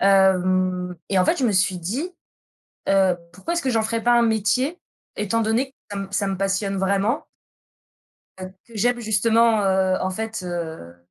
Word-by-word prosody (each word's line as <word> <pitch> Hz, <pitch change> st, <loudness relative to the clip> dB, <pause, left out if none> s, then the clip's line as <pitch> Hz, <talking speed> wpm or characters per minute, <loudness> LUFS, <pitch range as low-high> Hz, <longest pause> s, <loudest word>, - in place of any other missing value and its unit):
Hem 185 Hz, -2 st, +3 dB, 0.2 s
et 195 Hz, -, +3 dB
en 180 Hz, -, +4 dB
fait, 345 Hz, -, +3 dB
je 265 Hz, -, +1 dB
me 220 Hz, -, +1 dB
suis 190 Hz, -1 st, +1 dB
dit, 240 Hz, -, -3 dB, 0.8 s
heu: 190 Hz, -2 st, +3 dB, 0.2 s
«Pourquoi 195 Hz, -, -4 dB
est-ce 340 Hz, -, 0 dB
que 270 Hz, -, -1 dB
j'en 225 Hz, -3 st, +2 dB
ferais 230 Hz, +1 st, -1 dB
pas 240 Hz, -, +4 dB
un -, -, +4 dB
métier?», 235 Hz, -, +1 dB, 0.4 s
étant 210 Hz, +2 st, 0 dB
donné 230 Hz, +5 st, 0 dB
que -, -, -57 dB, 0.2 s
ça 200 Hz, -, -4 dB
me 195 Hz, 0 st, -4 dB
ça 200 Hz, 0 st, 0 dB
me 195 Hz, -1 st, -2 dB
passionne 195 Hz, 0 st, -1 dB
vraiment 200 Hz, +7 st, 0 dB, 1.1 s
heu, 185 Hz, 0 st, -7 dB, 0.2 s
que 230 Hz, -, -17 dB
j'aime 240 Hz, +3 st, +1 dB
justement, 225 Hz, 0 st, +3 dB
heu, 190 Hz, -1 st, +2 dB
en 185 Hz, -, 0 dB
fait, 220 Hz, +1 st, -4 dB
heu, 160 Hz, -, -6 dB
200 Hz, 185 wpm, -23 LUFS, 185-230 Hz, 1.1 s, en